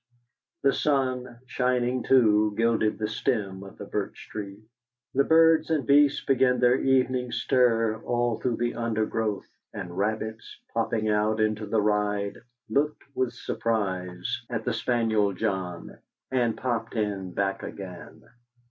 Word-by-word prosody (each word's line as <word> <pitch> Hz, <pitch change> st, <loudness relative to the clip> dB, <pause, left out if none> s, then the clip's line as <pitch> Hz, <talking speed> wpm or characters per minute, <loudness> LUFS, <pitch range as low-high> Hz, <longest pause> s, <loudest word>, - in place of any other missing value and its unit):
The 135 Hz, -, +4 dB
sun, 130 Hz, -4 st, -1 dB
shining 125 Hz, 0 st, 0 dB
too, 105 Hz, -5 st, +4 dB
gilded 115 Hz, -2 st, +2 dB
the 105 Hz, -, -1 dB
stem 105 Hz, -3 st, -2 dB
of 95 Hz, -, -12 dB
the -, -, -7 dB
birch -, -, -5 dB
tree. 100 Hz, -2 st, -6 dB, 0.5 s
The 140 Hz, -, +4 dB
birds 160 Hz, +1 st, +5 dB
and 155 Hz, -4 st, +1 dB
beasts 145 Hz, 0 st, +4 dB
began 125 Hz, -2 st, +3 dB
their 125 Hz, 0 st, +5 dB
evening 130 Hz, -2 st, +1 dB
stir 115 Hz, -4 st, +2 dB
all 120 Hz, -1 st, 0 dB
through 125 Hz, -2 st, 0 dB
the 120 Hz, 0 st, -1 dB
undergrowth, 110 Hz, -2 st, -1 dB, 0.3 s
and 90 Hz, -4 st, -6 dB
rabbits, 110 Hz, +2 st, -3 dB, 0.2 s
popping 115 Hz, -1 st, 0 dB
out 105 Hz, +1 st, +1 dB
into 110 Hz, 0 st, 0 dB
the 105 Hz, 0 st, +1 dB
ride, 105 Hz, -1 st, 0 dB, 0.3 s
looked 145 Hz, +7 st, 0 dB
with 130 Hz, -3 st, 0 dB
surprise 95 Hz, -6 st, -2 dB
at 115 Hz, -2 st, -3 dB
the 125 Hz, -, 0 dB
spaniel 115 Hz, -4 st, +1 dB
John, 95 Hz, -4 st, -3 dB, 0.3 s
and 120 Hz, -3 st, +1 dB
popped 120 Hz, -3 st, -2 dB
in 100 Hz, -4 st, -2 dB
back 95 Hz, -1 st, -1 dB
again. 95 Hz, -3 st, -9 dB
115 Hz, 135 wpm, -26 LUFS, 105-125 Hz, 0.5 s, birds